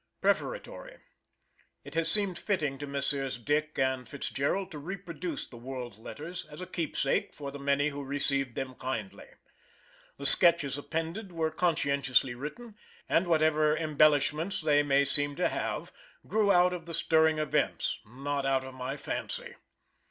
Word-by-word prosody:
PREFATORY. - - -2 0.9
It - - -11
has 165 0 +1
seemed 200 -2 +3
fitting 150 -10 -1
to 145 - -5
Messrs. 140 -2 -2
DICK 150 +5 -1 0.2
& 130 -1 -8
FITZGERALD 145 +7 -2
to 150 - -7
reproduce 175 -1 -5
the 120 - -13
World 120 -3 -7
letters, 160 +9 -7
as 150 - -10
a 185 - -5
keepsake 165 -6 -1
for 140 -2 -6
the 140 - -8
many 140 +1 +1
who 145 -1 -6
received 140 -2 -1
them 130 -1 -4
kindly. 120 -6 -5 0.9
The 140 - -7
Sketches 165 -2 +7
appended 165 +7 -4
were 160 -2 -1
conscientiously 140 -6 +2
written, 180 - -8 0.3
and 175 +2 +2
whatever 155 -2 +3
embellishments 155 +3 +2
they 150 -2 +4
may 140 -1 +3
seem 145 +1 +1
to - - +1
have - - -3 0.3
grew 210 0 +2
out 180 -1 +5
of 170 -2 -7
the 165 - -3
stirring 160 -1 +3
events, 155 -1 0
not 140 +5 -4
out 135 -1 +1
of 130 0 -9
my 130 +2 -4
fancy. 485 - -5
150 Hz, 150 wpm, -30 LUFS, 140-170 Hz, 0.9 s, Sketches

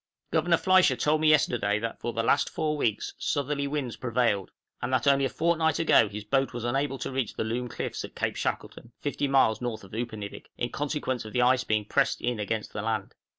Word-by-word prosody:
Governor 170 +1 +3
Fliescher 185 -8 +4
told 155 +4 +1
me 155 - +5
yesterday 120 -9 +3
that 115 +1 -4
for 120 - -3
the 115 0 -1
last 140 +4 +2
four 150 -1 -1
weeks 110 -8 -1
southerly 140 -1 -1
winds 140 -4 -3
prevailed, 115 -6 0 0.3
and - - -2
that 130 -3 +1
only 140 -1 +4
a - - 0
fortnight 165 +1 +1
ago 135 -9 +4
his 105 +1 -6
boat 135 +3 0
was 120 -1 -5
unable 135 +3 0
to - - -4
reach 130 -4 -2
the - - -1
Loom 120 +3 -2
Cliffs - - -4
at - - -9
Cape - - -1
Shackleton, 120 0 -4
50 145 0 -1
miles 135 -5 +3
north 115 -3 -4
of 95 - -14
Upernivik, 110 -3 -5
in 120 - -2
consequence 145 -4 -2
of 110 -1 -9
the 125 - +3
ice 125 +1 +4
being 110 -3 0
pressed 135 +5 +1
in 120 -2 -2
against 105 +1 -3
the 105 - -3
land. 110 -2 -2
125 Hz, 215 wpm, -27 LUFS, 110-145 Hz, 0.3 s, me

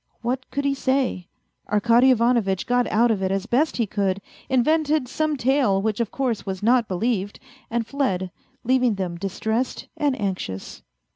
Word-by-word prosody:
What 255 +2 -2
could 280 0 -2
he 280 - +2
say? 260 -9 0 0.4
Arkady 235 +5 +4
Ivanovitch 235 -6 +2
got 245 0 +2
out 230 +2 +4
of 205 -3 -1
it 190 - 0
as 195 +1 -1
best 265 +7 +1
he 235 - +1
could, 200 -1 -1 0.3
invented 300 +2 +2
some 305 +3 -1
tale 255 -6 +2
which 210 +1 -1
of 230 -3 0
course 255 -5 -2
was 190 0 -5
not 240 0 +3
believed, 205 +1 -1 0.3
and 235 0 -1
fled, 195 -8 -1 0.3
leaving 250 -2 +2
them 180 -3 -4
distressed 220 +6 -2
and 285 -4 0
anxious. 185 - -4
235 Hz, 160 wpm, -23 LUFS, 195-260 Hz, 0.4 s, Arkady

